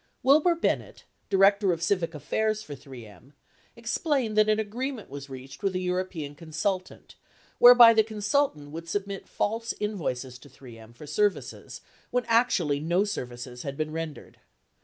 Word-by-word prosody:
Wilbur 305 +6 +5
Bennett, 335 - -2 0.3
Director 195 0 +4
of 165 -1 -3
Civic 170 -2 0
Affairs 215 +8 -1
for 150 - -8
3 130 -4 -11
M, 115 +7 -17 0.4
explained 240 0 -1
that 215 0 +4
an 215 0 +2
agreement 230 - -4
was 140 0 -8
reached 130 0 -10
with 195 -2 -1
a - - 0
European 180 -5 -3
consultant 165 +5 -4 0.5
whereby 245 -1 +9
the 220 - +5
consultant 210 - -1
would 165 +2 -8
submit 200 +1 -4
false 230 +2 -2
invoices 135 - -3
to 145 - -16
3 125 -2 -14
M 110 +1 -15
for 120 - -12
services 205 +7 -2 0.3
when 250 -1 -1
actually 220 -11 +2
no 170 +6 +1
services 125 -10 -6
had 140 -1 -6
been 155 0 -2
rendered. 160 -1 -7
185 Hz, 155 wpm, -27 LUFS, 145-215 Hz, 0.5 s, whereby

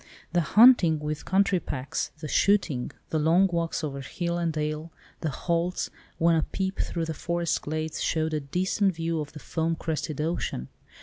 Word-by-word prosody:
The 175 - +4
hunting 195 - +6
with 150 0 -4
country 195 0 +3
packs, 135 -4 -3
the 155 - -4
shooting, 155 -8 +2 0.2
the 160 - +1
long 165 +5 +4
walks 170 -3 -1
over 140 -2 -3
hill 170 +6 -3
and 170 -1 0
dale—the 155 +1 -4
halts, 170 +4 -1 0.3
when 165 0 +4
a 160 - +3
peep 190 +4 -3
through 170 -2 -1
the 160 - -3
forest 170 +1 -1
glades 155 +1 -3
showed 160 0 0
a 155 - +1
distant 185 +6 0
view 165 -1 -1
of 150 - -7
the 150 - -8
foam 165 +2 -1
crested 155 -2 -3
ocean! 150 - -2
165 Hz, 170 wpm, -27 LUFS, 155-175 Hz, 0.3 s, hunting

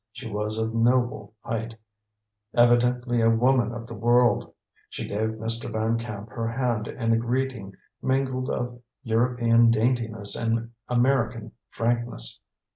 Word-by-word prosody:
She 110 - -8
was 105 0 -3
of 110 0 -1
noble 115 -3 +1
height, 115 0 -4 0.8
evidently 120 0 +3
a 115 - +5
woman 120 +1 +3
of 115 -1 -6
the 115 - -9
world. 120 +3 +3 0.4
She - - -5
gave 110 +2 -1
Mr. 115 +1 -2
Van 110 +1 0
Camp 110 -2 -7
her 115 -1 -3
hand 115 -2 -1
in 115 -2 0
a - - +3
greeting 120 -4 -2 0.3
mingled 130 -1 0
of 120 0 -3 0.2
European 115 0 +3
daintiness 115 -2 0
and 115 0 -1 0.2
American 120 -3 +1 0.2
frankness. 120 - -2
115 Hz, 130 wpm, -26 LUFS, 110-120 Hz, 0.8 s, a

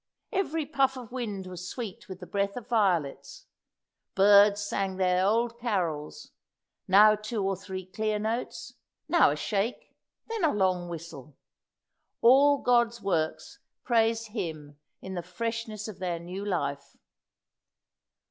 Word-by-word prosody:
Every 325 -7 -1
puff 270 -2 +1
of 245 -3 -9
wind 215 -7 -4
was 180 0 -7
sweet 230 -3 -7
with 190 0 -8
the - - -7
breath 200 +2 -2
of 245 - -7
violets; 185 - 0 0.7
birds 200 +1 +6
sang 195 -2 -2
their 185 -1 +2
old 230 +4 +1
carols 175 -11 -3 0.6
now 210 +3 +7
two 215 0 -3
or 195 0 0
three 190 0 -7
clear 215 +3 -2
notes 220 +3 -4 0.3
now - - +5
a - - -1
shake 215 +3 -3 0.3
then 450 -4 -3
a 315 - +4
long 185 -3 +1
whistle. 155 -5 -9 0.8
All 280 +4 +6
God's 235 -1 +3
works 195 - -2 0.2
praised 225 -1 +1
Him 155 -9 -6 0.2
in 190 - -6
the 175 - -3
freshness 225 +3 -4
of 215 - -9
their 180 -2 -2
new 180 +4 -7
life. 145 -8 -3
205 Hz, 135 wpm, -28 LUFS, 180-230 Hz, 0.8 s, now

